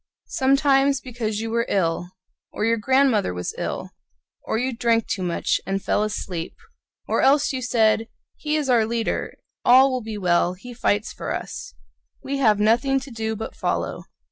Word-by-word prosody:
— - - -69
Sometimes 275 0 +3
because 225 -5 -4
you 225 0 -4
were 235 0 0
ill; 175 -2 0 0.4
Or 210 - -2
your 230 0 +2
grandmother 260 - +2
was 90 0 -4
ill; - - -4 0.5
Or - - -2
you 255 +2 -1
drank 230 -1 +2
too 195 - -3
much 175 -2 0
and 195 +1 -2
fell 200 - 0
asleep; 185 -5 -4 0.5
Or - - +1
else 280 +1 +4
you 260 - -3
said: 225 -2 +2 0.3
"He 300 0 -2
is 300 -3 0
our 235 -4 +3
leader, 230 0 -2 0.3
All 260 +2 +6
will 255 -1 -1
be 220 -1 -6
well; 180 -2 +2
he 245 +7 -10
fights 210 -2 0
for - - -5
us; - - -7 0.5
We 280 +1 -2
have 215 -6 +3
nothing 240 +6 +3
to 265 0 -11
do 220 -1 -3
but 220 - -6
follow." - - -2
230 Hz, 175 wpm, -23 LUFS, 210-265 Hz, 0.5 s, All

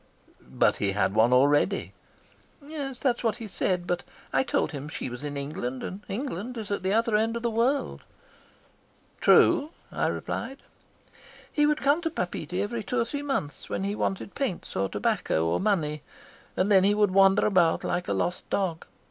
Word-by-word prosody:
"But - - +2
he 100 -1 0
had 95 -1 +1
one 110 +3 +4
already." 145 +9 +3 0.7
"That 275 -4 -2
is - - -8
what 225 -2 +1
he 230 - -7
said, 180 -2 -1
but 175 0 -1 0.3
I 135 - +4
told - - 0
him 145 0 -6
she 130 - -5
was 125 +3 -7
in 145 -1 -4
England, 135 -3 -4
and 190 +2 -6
England 240 0 -4
is 215 -3 -6
at 200 - -1
the 190 +1 0
other 225 +1 +2
end 225 +2 +1
of 235 - -7
the 235 - 0
world." 245 +5 0 1.2
"True," 295 +1 +5 0.2
I - - 0
replied. 270 +1 -4 0.9
"He 295 -1 +3
would 300 -1 0
come 285 +4 +3
to 330 - -1
Papeete 180 - -4
every 230 +2 -3
two 250 +4 -1
or 230 - +2
three 285 +5 -4
months, 270 - -3
when - - -2
he 200 +1 -1
wanted 195 -1 -2
paints 265 -11 -3
or 95 0 0
tobacco 80 +1 0
or 80 - +1
money, 160 -8 0 0.6
and 190 +3 +2
then 190 -2 +6
he 205 +1 +4
would 210 -2 +3
wander 195 +1 +5
about 175 -5 +3
like 180 - -2
a - - 0
lost 180 - -2
dog. 180 -5 -1
195 Hz, 185 wpm, -27 LUFS, 150-235 Hz, 1.2 s, then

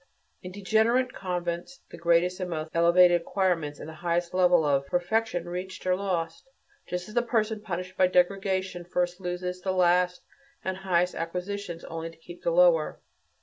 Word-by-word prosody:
In 180 - -8
"degenerate" 220 +6 +2
convents 175 +5 -4
the - - -9
greatest 170 +2 +2
and 185 -1 -3
most 160 -1 -4
elevated 175 +1 +5
acquirements, 170 -5 -1
and - - -8
the 160 - -8
highest 170 +2 -1
level 180 -3 +4
of 140 -1 +1
perfection 180 +2 0
reached, 185 +2 -6
are 185 0 +3
lost; 180 +2 -3 0.4
just 180 +1 -4
as 215 - -11
a 240 - +4
person 220 -2 0
punished 185 -2 -5
by 185 - +5
degradation 190 0 +1
first 175 +1 -1
loses 180 0 -4
the 190 - -1
last 180 0 +2 0.4
and 190 0 -2
highest 180 -2 +1
acquisitions, 180 +1 -4
and - - -9
only 165 0 -4
keeps 175 +2 -13
the - - +1
lower. 170 -2 +4
180 Hz, 165 wpm, -27 LUFS, 170-190 Hz, 0.4 s, elevated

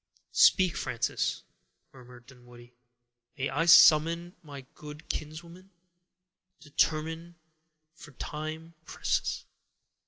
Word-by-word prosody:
"Speak, 185 -4 +4
Frances," 115 - -2 0.5
murmured 125 -2 -16
Dunwoodie; 120 -1 -17 0.6
"may 135 0 -2
I 165 - -1
summon 170 +2 +5
my 145 -4 -10
good 150 +1 -12
kinswoman? 170 +5 -8 0.9
Determine, 160 +3 -2 0.6
for 160 -2 -15
time 155 +4 -7
presses." - - -3
155 Hz, 85 wpm, -28 LUFS, 135-165 Hz, 0.9 s, summon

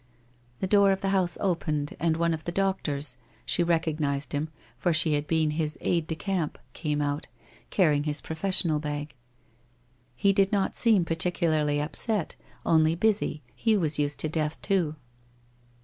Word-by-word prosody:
The - - +1
door 200 0 +5
of 195 - -1
the 195 - 0
house 190 -2 +2
opened 155 -6 -1
and 160 0 +1
one 170 0 +1
of 160 0 -6
the 175 - -2
doctors 150 -8 -1
— - - -32
she - - +2
recognized 155 -4 0
him, 150 +2 -1 0.3
for 165 +8 0
she 155 -1 +3
had 145 0 -1
been 160 -2 +1
his 155 0 -2
aide 170 -2 0
de 160 - -2
camp 180 -3 -2
— - - -37
■ - - -35
came 150 -2 -1
out, 145 +1 -2 0.4
carrying 150 -6 +2
his 150 -1 -1
professional 160 -1 +1
bag. 145 -1 -4 1.0
He 195 +10 +3
did 195 -1 +2
not 200 -2 0
seem 215 -7 +4
particularly 160 -3 +1
upset, 170 +5 -1 0.3
only 160 0 +4
busy, 195 -6 0
he 225 -2 +2
was 155 -5 +1
used 145 -1 -1
to - - 0
death 155 -1 -2
too. 180 -7 +1
160 Hz, 170 wpm, -27 LUFS, 150-185 Hz, 1.0 s, door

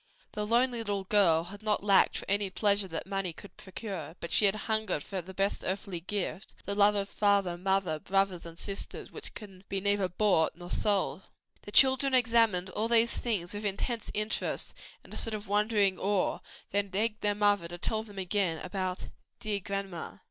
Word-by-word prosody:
The 210 0 -3
lonely 240 +2 +2
little 205 -3 -2
girl 185 -5 +4
had 200 +4 -10
not 215 -2 0
lacked 200 -2 +4
for - - -5
any 200 0 +1
pleasure 200 0 +2
that 165 -3 -5
money 195 -2 -2
could 200 - -12
procure: 190 -5 -7
but 170 - -6
she 210 - +5
had 195 - +2
hungered 220 -9 0
for 190 -2 -4
that 190 +2 -11
best 195 +1 0
earthly 190 -1 -3
gift 195 +2 -4
the 200 - 0
love 205 0 +5
of 200 -1 -1
father, 200 -4 +2
mother, 185 -3 0
brothers 195 0 0
and 165 -1 -10
sisters 200 +2 -6
which - - -8
can 195 -4 -10
be 195 - -1
neither 200 -1 +1
bought 180 -3 +3
nor 175 +1 -10
sold. 200 -2 +1 0.4
The 205 - -10
children 265 +2 +6
examined 225 -7 +3
all 215 +4 -1
these 235 0 +4
things 205 -7 -2
with 205 +1 -5
intense 210 +3 -2
interest 215 +1 -1 0.3
and - - -11
a - - -5
sort 225 -1 0
of 210 0 -7
wondering 205 -2 +2
awe, 200 -1 0 0.3
then 200 0 +1
begged 210 +3 -1
their 205 0 +2
mother 205 -4 +2
to 175 +1 -6
tell 215 +5 -1
them 205 -2 -12
again 185 -3 0
about 185 0 -3 0.3
"dear 210 -3 -1
grandma." 195 -3 -5
200 Hz, 190 wpm, -30 LUFS, 185-210 Hz, 0.4 s, children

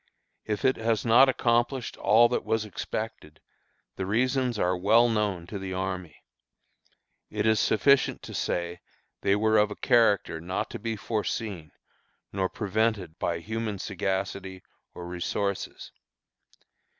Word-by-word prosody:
If 105 +3 -2
it 130 - +3
has 115 0 0
not 120 +4 +6
accomplished 120 0 0
all 115 +3 +5
that 125 - -1
was 110 -1 0
expected, 105 -6 -6 0.6
the 95 - -3
reasons 125 +2 +1
are 90 -2 +1
well 110 +6 +4
known 105 -6 -1
to 100 +3 -6
the 95 -1 -5
army. 95 -4 -4 1.1
It 105 0 -2
is 110 -1 +3
sufficient 140 +8 +3
to - - -8
say 85 0 -2 0.4
they 100 - +3
were 110 +1 +3
of 105 0 +3
a 105 - -6
character 110 - +2
not 90 +3 -3
to - - -6
be 115 +1 -3
foreseen 105 -5 -3 0.6
nor 95 -1 0
prevented 105 -5 -1
by 85 -1 -1
human 110 +1 -3
sagacity 95 0 -3 0.3
or 90 - -7
resources. 90 +3 -3
105 Hz, 135 wpm, -27 LUFS, 95-115 Hz, 1.1 s, not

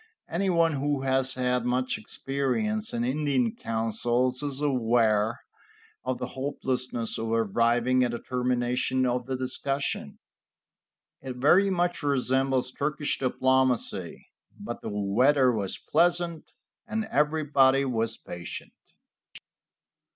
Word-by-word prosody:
Anyone 170 -2 +2
who 140 -1 -1
has 130 0 +1
had 125 -1 0
much 125 +1 0
experience 210 - -2
in 120 - -2
Indian 130 -3 0
councils 120 +3 0
is 140 -2 -2
aware 115 -5 +1 0.6
of 130 0 -2
the 125 0 -5
hopelessness 130 -3 -2
of 115 0 -3
arriving 115 +3 +2
at 120 - 0
a - - -2
termination 125 +1 0
of 125 0 -1
the 130 -1 -2
discussion. 135 +2 -2 1.0
It 130 -1 -6
very 175 +10 +4
much 175 -2 0
resembles 130 -2 +1
Turkish 150 +2 -2
diplomacy. 130 -7 0 0.3
But - - -6
the - - -5
weather 125 +7 +3
was 100 -5 -2
pleasant, 175 -1 0 0.4
and 220 0 -2
everybody 140 -3 +3
was 115 -3 -1
patient. 85 0 -8
130 Hz, 110 wpm, -27 LUFS, 120-145 Hz, 1.0 s, very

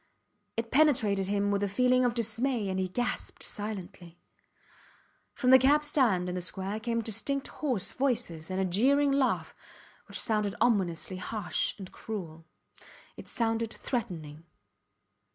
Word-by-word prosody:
It 230 0 -3
penetrated 225 -10 +3
him 205 0 +1
with 200 0 0
a 205 - +1
feeling 250 +5 +3
of 240 -1 +1
dismay 230 -1 0
and 190 0 -1
he 185 - 0
gasped 245 +6 -3
silently. 190 -5 -6 1.2
From 255 -1 +2
the 260 - +9
cab 290 +4 +4
stand 240 -12 +2
in 180 - -3
the 180 - -3
square 190 +4 -3
came 230 0 -1
distinct 250 +6 0
hoarse 250 -11 0
voices 235 - -1
and 185 0 -2
a 190 - +2
jeering 275 +10 +3
laugh 275 -1 +1 0.5
which - - -2
sounded 210 -2 0
ominously 190 -6 +1
harsh 210 +3 -1
and 190 -3 -9
cruel. 165 -7 -7 0.7
It - - -11
sounded 225 -1 0
threatening. 165 - -4
220 Hz, 140 wpm, -29 LUFS, 190-250 Hz, 1.2 s, the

